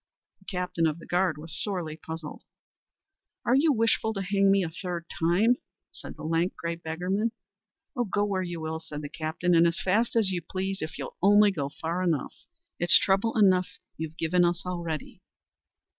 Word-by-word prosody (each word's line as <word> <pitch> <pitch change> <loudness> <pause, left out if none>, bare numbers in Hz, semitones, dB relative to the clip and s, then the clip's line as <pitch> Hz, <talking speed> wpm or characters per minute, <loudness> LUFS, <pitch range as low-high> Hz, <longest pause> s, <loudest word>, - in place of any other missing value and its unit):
The 190 - -24
captain 180 -3 -1
of 155 0 -2
the 170 - -12
guard 175 -3 +1
was 160 +1 -5
sorely 180 -7 -2
puzzled. 160 -2 -8 1.0
"Are 240 - +3
you 295 +4 +4
wishful 225 -2 +1
to 195 - -2
hang 195 +1 +2
me 195 -1 +3
a 165 - -4
third 175 0 -5
time?" 195 +9 +3 0.3
said - - -9
the - - -10
lank, 165 +3 0
grey 170 0 -3
beggarman. 180 +7 -2 0.8
"Go 205 0 +2
where 195 -2 -1
you 175 -2 -4
will," 160 0 -3
said 155 -2 -7
the 145 - -5
captain, 160 +3 -1
"and 170 0 +6
as 170 - 0
fast 220 +6 +1
as 215 -4 +3
you 175 -2 -2
please 190 +3 -3
if 160 - -5
you'll - - -7
only 205 +2 +6
go 145 -7 -3
far 165 +4 -3
enough. 165 -7 0 0.5
It's 175 - +7
trouble 200 +4 +1
enough 185 -3 +3 0.2
you've 160 0 -6
given 175 +2 +2
us 175 +1 0
already." 170 -4 -4
180 Hz, 180 wpm, -27 LUFS, 160-195 Hz, 1.0 s, It's